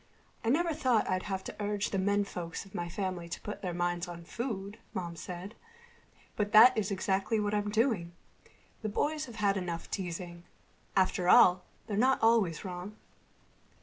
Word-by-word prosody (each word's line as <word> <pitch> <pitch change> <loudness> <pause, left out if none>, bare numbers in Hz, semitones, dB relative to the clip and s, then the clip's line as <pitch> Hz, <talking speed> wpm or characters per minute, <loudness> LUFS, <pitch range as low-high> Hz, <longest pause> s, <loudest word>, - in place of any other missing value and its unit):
"I 225 - 0
never 330 +5 +2
thought 255 -7 +2
I'd 185 0 0
have 190 -1 -2
to - - -7
urge 205 0 -1
the 195 - 0
menfolks 195 -4 -1
of 195 - -17
my 175 0 -3
family 180 -2 -4
to - - -5
put 210 - -6
their 180 - -2
minds 175 0 -1
on 170 -1 -8
food," 205 +1 -5 0.2
Mom 170 -2 -3
said, 180 +5 -7 0.8
"but 210 +1 -1
that 240 +4 +9
is 215 -2 0
exactly 195 +2 0
what 205 0 -1
I'm 205 0 0
doing. 210 -6 +1 0.7
The 215 - -2
boys 300 +8 -1
have 235 - -11
had 200 -2 +1
enough 175 -3 -4
teasing. 175 -2 -4 0.5
After 185 -1 +2
all, 180 0 +7 0.2
they're 205 - -3
not 260 +4 +4
always 220 -7 +3
wrong." 185 +3 -6
195 Hz, 170 wpm, -31 LUFS, 180-215 Hz, 0.8 s, that